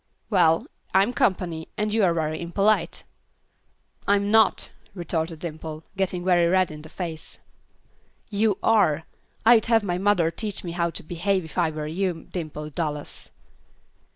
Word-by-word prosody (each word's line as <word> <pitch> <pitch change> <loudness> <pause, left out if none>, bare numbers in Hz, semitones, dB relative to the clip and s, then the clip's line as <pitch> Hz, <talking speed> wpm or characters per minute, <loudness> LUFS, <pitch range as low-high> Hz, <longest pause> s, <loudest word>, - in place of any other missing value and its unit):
"Well, 165 -5 +4 0.3
I'm 200 +6 +4
company, 175 -7 0
and 210 0 -1
you're 195 -6 +3
very 155 0 -1
impolite." 195 +5 +1 1.0
"I'm 200 0 +2
not," 220 0 +4 0.2
retorted 165 -2 -2
Dimple, 155 -1 -6
getting 185 -2 -1
very 175 -2 +4
red 185 -1 +2
in 150 0 -9
the 155 - -11
face. 165 -3 -6 0.9
"You 210 -1 +2
are. 180 -9 +3 0.4
I'd 225 -1 +6
have 225 -2 +4
my 180 -2 -1
mother 185 -4 +3
teach 210 +3 -4
me 175 - -4
how 170 0 0
to - - -5
behave, 180 +3 -1
if 160 - -12
I 175 -3 +2
were 155 -1 -5
you, 175 +1 -2
Dimple 155 -3 -5
Dallas." 150 -2 -4
175 Hz, 145 wpm, -25 LUFS, 160-200 Hz, 1.0 s, I'd